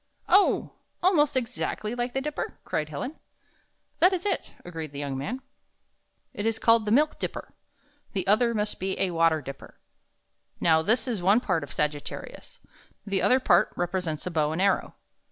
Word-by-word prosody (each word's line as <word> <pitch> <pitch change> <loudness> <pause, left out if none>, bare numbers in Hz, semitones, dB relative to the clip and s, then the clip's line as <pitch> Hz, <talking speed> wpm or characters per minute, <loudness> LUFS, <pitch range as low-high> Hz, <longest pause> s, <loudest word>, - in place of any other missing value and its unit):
"Oh! 400 +1 +4 0.3
almost 300 -7 +4
exactly 230 -2 -3
like 245 0 -2
the 270 - +1
Dipper?" 300 +1 -4
cried 155 0 -2
Helen. 155 - -5 0.8
"That 360 +3 +6
is 370 +1 -2
it," 400 - -2
agreed 160 -4 -6
the - - -7
young 140 -1 -3
man. 210 - -4 0.9
"It 205 - -2
is 225 -1 +1
called 230 -1 +4
the 210 - -1
Milk 300 +6 +3
Dipper. - - -5 0.6
The 190 -3 -1
other 230 +4 +3
must 210 0 -1
be 190 +1 -2
a 185 - +1
water 165 -2 +3
dipper. 135 +1 -10 0.8
Now, 160 -1 +4
this 225 +10 +1
is 225 -7 -2
one 200 +6 +5
part 185 - 0
of 145 - -9
Sag 150 0 +1
it 145 - -9
ta - - -4
ri - - -9
us. - - -16 0.5
The 200 -2 0
other 255 - +4
part 185 -9 +4
represents 175 -3 -2
a 180 - -3
bow 155 -2 +1
and 160 - -3
arrow. 195 0 +1
200 Hz, 185 wpm, -27 LUFS, 160-245 Hz, 0.9 s, That